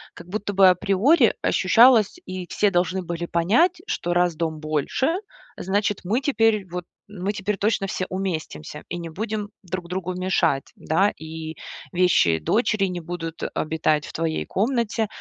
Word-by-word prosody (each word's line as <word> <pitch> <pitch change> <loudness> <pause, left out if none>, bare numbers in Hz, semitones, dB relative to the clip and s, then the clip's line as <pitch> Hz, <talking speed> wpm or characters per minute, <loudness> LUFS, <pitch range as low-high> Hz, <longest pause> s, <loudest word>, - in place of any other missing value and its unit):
как - - -12
будто 205 +2 -3
бы 190 -1 +7
априори 205 - +3
ощущалось, 225 - +5
и 185 -1 -6
все 205 -1 +1
должны 185 +1 0
были 170 0 -4
понять, 245 - +2
что 175 - -2
раз 175 -2 +2
дом 160 -1 -2
больше, 155 - 0 0.4
значит 205 +2 -1
мы 220 +9 0
теперь, 225 -7 +2
вот, 175 0 -6 0.2
мы 205 0 -3
теперь 200 +1 -2
точно 205 -1 +1
все 185 -2 -2
уместимся 165 -5 -4
и 175 - -4
не 170 -1 -6
будем 210 +3 -4
друг 180 -1 -5
другу 185 0 -3
мешать, 180 -7 0
да, 190 +6 +2
и 160 0 -7 0.3
вещи 175 - +3
дочери 215 - +1
не 180 -2 -4
будут 165 -1 -6
обитать 155 -1 0
в - - -10
твоей 160 -1 -2
комнате. 225 0 0
185 Hz, 155 wpm, -23 LUFS, 170-210 Hz, 0.4 s, бы